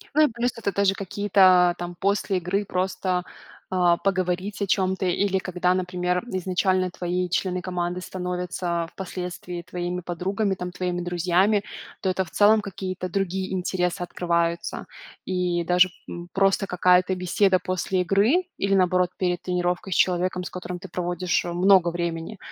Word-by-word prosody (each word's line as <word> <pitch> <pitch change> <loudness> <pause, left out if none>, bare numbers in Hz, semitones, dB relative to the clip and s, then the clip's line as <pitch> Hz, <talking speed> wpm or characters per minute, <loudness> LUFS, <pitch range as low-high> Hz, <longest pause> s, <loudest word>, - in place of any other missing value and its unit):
Ну 305 0 +6
и - - -7
плюс 240 +2 -1
это 200 -3 -2
даже 200 -1 +3
какие-то 190 -2 +4
там 175 0 -6
после 200 +1 0
игры 190 +4 -1
просто, 185 -1 -1 0.5
а, 175 -2 +4
поговорить 185 +2 -1
о 200 - 0
чем-то 190 0 +1
или 190 +2 +1
когда, 180 -1 0
например, 180 -1 -1
изначально 185 0 +1
твои 180 0 -2
члены 185 0 -1
команды 180 0 -3
становятся 180 -2 -3
впоследствии 180 -1 -6
твоими 175 +1 -4
подругами, 190 +4 -1
там 180 -1 -6
твоими 180 -1 -2
друзьями. 180 +4 +2 0.4
То 190 - 0
это 185 0 0
в - - -16
целом 210 +1 +5
какие-то 190 -2 -5
другие 190 0 -2
интересы 180 0 -1
открываются. 170 -1 -1 0.4
И 180 -2 -1
даже, 180 +2 +4 0.2
м, 175 0 -7
просто 195 0 +2
какая-то 180 +1 +3
беседа 185 +1 +2
после 185 0 -1
игры 205 - +3
или 195 0 +1
наоборот 180 -1 +2
перед 180 -2 0
тренировкой 180 +1 -1
с - - -2
человеком, 180 0 +1
с - - -6
которым 180 0 -6
ты 190 +1 -10
проводишь 175 0 -1
много 175 +1 +4
времени, 170 +3 -4
180 Hz, 150 wpm, -24 LUFS, 180-190 Hz, 0.5 s, Ну